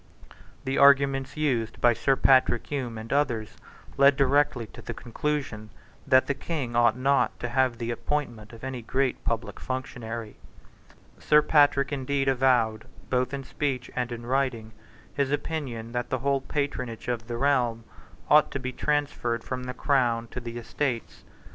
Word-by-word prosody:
The 135 Hz, +1 st, 0 dB
arguments 140 Hz, -1 st, +4 dB
used 120 Hz, -7 st, -1 dB
by 120 Hz, -1 st, +5 dB
Sir 135 Hz, +4 st, +2 dB
Patrick 130 Hz, -2 st, +4 dB
Hume 125 Hz, -6 st, -4 dB
and 110 Hz, +3 st, -5 dB
others 120 Hz, -7 st, 0 dB, 0.4 s
led 140 Hz, 0 st, +6 dB
directly 140 Hz, -2 st, +2 dB
to -, -, -13 dB
the -, -, -6 dB
conclusion 120 Hz, -3 st, -3 dB, 0.4 s
that 130 Hz, -1 st, +5 dB
the 140 Hz, -, 0 dB
King 140 Hz, -5 st, -4 dB
ought 120 Hz, -1 st, +4 dB
not 140 Hz, +2 st, +1 dB
to 120 Hz, -, -3 dB
have 130 Hz, -1 st, +1 dB
the 115 Hz, 0 st, -3 dB
appointment 120 Hz, -4 st, -3 dB
of 115 Hz, 0 st, -13 dB
any 130 Hz, -2 st, -4 dB
great 130 Hz, +3 st, -1 dB
public 115 Hz, 0 st, -3 dB
functionary. 120 Hz, -4 st, -5 dB, 0.8 s
Sir 150 Hz, 0 st, +4 dB
Patrick 145 Hz, -2 st, +3 dB
indeed 135 Hz, 0 st, -1 dB
avowed, 125 Hz, -4 st, +2 dB, 0.3 s
both 125 Hz, -1 st, +1 dB
in 140 Hz, -1 st, -4 dB
speech 135 Hz, -3 st, -3 dB
and 125 Hz, -1 st, -2 dB
in 120 Hz, 0 st, -6 dB
writing, 125 Hz, -4 st, -1 dB, 0.4 s
his 140 Hz, -1 st, 0 dB
opinion 140 Hz, -6 st, -3 dB
that 120 Hz, 0 st, -3 dB
the 130 Hz, -, 0 dB
whole 135 Hz, +2 st, 0 dB
patronage 130 Hz, -5 st, -3 dB
of 115 Hz, -2 st, -3 dB
the 120 Hz, -1 st, -4 dB
realm 120 Hz, -4 st, +1 dB, 0.4 s
ought 150 Hz, 0 st, +5 dB
to 140 Hz, -, -4 dB
be 130 Hz, 0 st, -4 dB
transferred 140 Hz, -5 st, -1 dB
from 125 Hz, -1 st, -5 dB
the 125 Hz, -, -4 dB
Crown 120 Hz, -5 st, +1 dB
to -, -, -6 dB
the 120 Hz, -1 st, -7 dB
Estates. 120 Hz, +1 st, -3 dB
130 Hz, 160 wpm, -26 LUFS, 120-140 Hz, 0.8 s, led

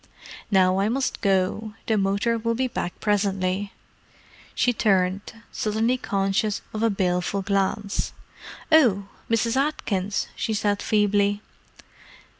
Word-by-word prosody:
Now 185 Hz, -1 st, +3 dB
I 200 Hz, +2 st, +2 dB
must 265 Hz, +3 st, -1 dB
go: 200 Hz, +2 st, 0 dB
the 220 Hz, -, +1 dB
motor 200 Hz, +3 st, +1 dB
will 230 Hz, +1 st, -1 dB
be 260 Hz, +2 st, 0 dB
back 180 Hz, -7 st, -4 dB
presently." 195 Hz, -1 st, 0 dB, 0.8 s
She 245 Hz, -, +2 dB
turned, 195 Hz, -3 st, +1 dB, 0.2 s
suddenly 220 Hz, +3 st, 0 dB
conscious 200 Hz, -2 st, -1 dB
of 215 Hz, -, -3 dB
a 230 Hz, -, +3 dB
baleful 190 Hz, 0 st, 0 dB
glance. 200 Hz, +1 st, -1 dB, 0.6 s
"Oh!—Mrs. 230 Hz, -3 st, +2 dB
Atkins!" 205 Hz, -9 st, -1 dB
she 220 Hz, -, -2 dB
said 205 Hz, -1 st, 0 dB
feebly. 205 Hz, -1 st, +2 dB
205 Hz, 110 wpm, -24 LUFS, 195-225 Hz, 0.8 s, Now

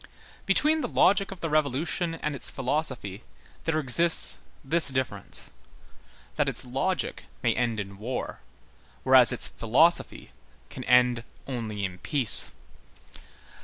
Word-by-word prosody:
Between 305 Hz, +11 st, +2 dB
the -, -, -3 dB
logic 195 Hz, +1 st, +2 dB
of 190 Hz, -2 st, -10 dB
the 165 Hz, -, -3 dB
Revolution 155 Hz, +3 st, -1 dB
and 150 Hz, -2 st, -4 dB
its 140 Hz, -, +1 dB
philosophy 130 Hz, -7 st, -4 dB, 0.4 s
there 160 Hz, -1 st, -1 dB
exists 155 Hz, +4 st, +4 dB, 0.3 s
this 165 Hz, +4 st, +6 dB
difference—that 130 Hz, -7 st, -6 dB
its -, -, -6 dB
logic -, -, -3 dB, 0.2 s
may -, -, +2 dB
end 115 Hz, -3 st, -2 dB
in 100 Hz, -1 st, -8 dB
war, 125 Hz, +4 st, -5 dB, 0.6 s
whereas 130 Hz, -1 st, +7 dB
its 125 Hz, -, +1 dB
philosophy 155 Hz, +10 st, 0 dB, 0.4 s
can 130 Hz, -, -8 dB
end 125 Hz, -1 st, +3 dB, 0.2 s
only 110 Hz, -6 st, -5 dB
in 90 Hz, -1 st, -8 dB
peace. 130 Hz, -, +1 dB
130 Hz, 120 wpm, -26 LUFS, 115-165 Hz, 0.6 s, whereas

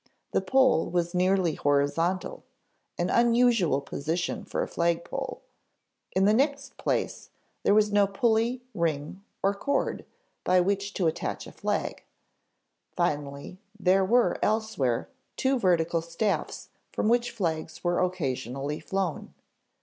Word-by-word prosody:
The -, -, +2 dB
pole 260 Hz, -10 st, +3 dB
was 175 Hz, 0 st, -1 dB
nearly 185 Hz, -2 st, +2 dB
horizontal, 165 Hz, -, 0 dB, 0.5 s
an -, -, 0 dB
unusual 235 Hz, -, +3 dB
position 160 Hz, +5 st, -3 dB
for -, -, -2 dB
a -, -, -4 dB
flagpole; 170 Hz, +11 st, -2 dB, 0.7 s
in 190 Hz, +1 st, +4 dB
the 210 Hz, -, +5 dB
next 275 Hz, +3 st, 0 dB
place, -, -, -2 dB, 0.3 s
there 200 Hz, -, +3 dB
was 210 Hz, -1 st, +4 dB
no 205 Hz, -1 st, +4 dB
pulley, 230 Hz, +4 st, +1 dB
ring, 165 Hz, +2 st, -2 dB, 0.2 s
or 195 Hz, +1 st, +3 dB
cord 280 Hz, +7 st, -1 dB, 0.4 s
by 185 Hz, 0 st, +4 dB
which 200 Hz, +2 st, 0 dB
to 185 Hz, -, 0 dB
attach 160 Hz, -, -2 dB
a -, -, -10 dB
flag; -, -, -3 dB, 0.9 s
finally, 145 Hz, +4 st, -2 dB, 0.2 s
there 190 Hz, 0 st, +4 dB
were 235 Hz, +5 st, +3 dB
elsewhere 210 Hz, -, 0 dB, 0.3 s
two 265 Hz, 0 st, +1 dB
vertical 170 Hz, -4 st, +2 dB
staffs 170 Hz, +5 st, -2 dB, 0.2 s
from -, -, -1 dB
which 240 Hz, +1 st, +3 dB
flags 165 Hz, -8 st, -3 dB
were 175 Hz, 0 st, +1 dB
occasionally 140 Hz, -5 st, -2 dB
flown. 190 Hz, -4 st, -3 dB
185 Hz, 125 wpm, -27 LUFS, 165-220 Hz, 0.9 s, the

